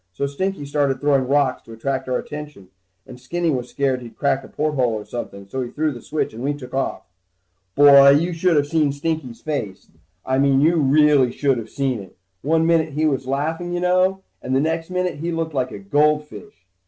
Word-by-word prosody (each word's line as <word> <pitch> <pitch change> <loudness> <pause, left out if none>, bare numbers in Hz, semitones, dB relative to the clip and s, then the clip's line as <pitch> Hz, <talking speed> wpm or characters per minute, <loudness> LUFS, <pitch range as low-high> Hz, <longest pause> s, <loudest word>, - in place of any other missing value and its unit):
So 140 - -2
Stinky 165 +3 -3
started 140 -2 0
throwing 140 -3 +2
rocks 140 -2 +1
to 115 - -13
attract 130 +3 -3
our 125 - +1
attention, 150 -11 -8 0.4
and 125 - -12
Skinny 170 +6 -1
was 125 -3 -3
scared 135 -2 0
that - - -11
he'd 115 - -12
crack 135 -1 0
a - - -11
porthole 140 -6 0
or 105 -1 -5
something, 100 -3 -7
so 130 +6 -4
he 125 - -4
threw 155 +3 -1
the 120 -4 -9
switch 155 -6 -3
and 115 +3 -7
we 145 +1 -1
took 125 -3 -11
off. 135 0 -2 0.7
Boy, 140 -1 +8
you 165 +6 +3
should 165 0 +2
of 145 - +3
seen 150 -1 +1
Stinky's 140 -4 -4
face. 115 -11 -5 0.3
I 130 0 0
mean 135 -1 +3
you 165 +4 +3
really 145 -3 +4
should 135 -2 0
of 110 -1 -8
seen 135 -3 -2
it. 95 -2 -13 0.2
One 160 +2 +2
minute 165 -2 +2
he 155 +2 0
was 135 -4 0
laughing 160 +6 -2
you 175 - -1
know, 185 +2 +1 0.2
and 130 +1 -2
the - - +3
next 165 +3 -1
minute 180 0 -2
he 170 +2 -3
looked 165 -1 -3
like 130 -2 -1
a - - -7
goldfish. 150 - -1
145 Hz, 215 wpm, -21 LUFS, 130-160 Hz, 0.7 s, Boy